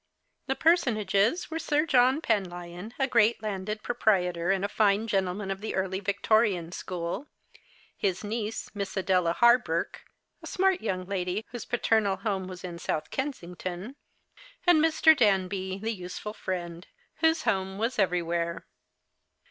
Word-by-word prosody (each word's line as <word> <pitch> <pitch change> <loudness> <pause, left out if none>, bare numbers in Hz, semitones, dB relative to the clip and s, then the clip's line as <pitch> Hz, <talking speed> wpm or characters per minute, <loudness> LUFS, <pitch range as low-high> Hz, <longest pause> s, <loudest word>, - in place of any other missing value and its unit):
The 265 - 0
personages 230 - +2
were 325 - -2
Sir 300 -1 +1
John 260 0 +4
Penlyon, 180 - -3
a 270 - +2
great 230 -3 +3
landed 210 +1 -3
pro - - -2
prietor, 180 -7 +1
and 195 0 +1
a - - -3
line 210 0 +4
gentleman 195 -1 -1
of 195 0 -5
the 220 - -4
early 190 0 -1
Victorian 200 -3 +1
school; 180 - -4 0.7
his 190 -1 -1
niece, 215 +1 -4
Miss 200 -1 -4
Adela 180 -3 +2
Hawberk, 235 -7 +3 0.4
a - - -9
smart 380 -1 +1
yonng 185 -1 -3
lady, 190 +1 -2
whose 240 -1 -6
paternal 220 -4 +1
home 190 -1 -2
was 185 0 -9
in 175 -2 -6
Sonth 155 - -3
Kensington; 185 - -5 0.7
and 345 -4 +5
^Ir. 320 0 +5
Danby, 190 -5 +1
the 220 +3 -2
useful 185 +2 -6
friend, 175 -3 -5 0.3
whose 320 0 +2
home 190 -1 0
was 230 +3 -1
everywhere. 170 -2 0
200 Hz, 140 wpm, -28 LUFS, 185-235 Hz, 0.7 s, and